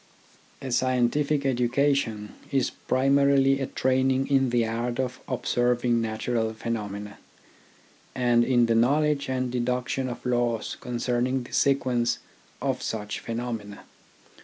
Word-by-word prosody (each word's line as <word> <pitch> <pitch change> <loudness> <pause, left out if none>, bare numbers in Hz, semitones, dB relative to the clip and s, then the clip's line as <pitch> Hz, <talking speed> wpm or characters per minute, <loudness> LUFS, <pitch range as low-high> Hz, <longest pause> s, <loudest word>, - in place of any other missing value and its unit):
A 130 - -4
scientific 130 +4 +1
education 125 -4 0 0.2
is 135 -2 +1
primarily 135 0 +3
a 135 - -1
training 130 +1 +1
in 135 -2 +3
the 120 -1 +2
art 120 +2 -3
of 130 0 -2
observing 120 -1 +1
natural 110 0 -2
phenomena, 105 -3 -5 1.0
and 120 -2 +3
in 120 -1 +3
the 115 - +2
knowledge 140 +5 +2
and 130 -1 -1
deduction 125 +1 -1
of 120 - -8
laws 120 -2 0
con 125 - -5
cerning 125 +2 0
the - - -13
sequence 130 -4 +2 0.5
of 135 -2 -1
such 105 -1 -4
phenomena. 115 -3 -5
125 Hz, 120 wpm, -26 LUFS, 115-130 Hz, 1.0 s, primarily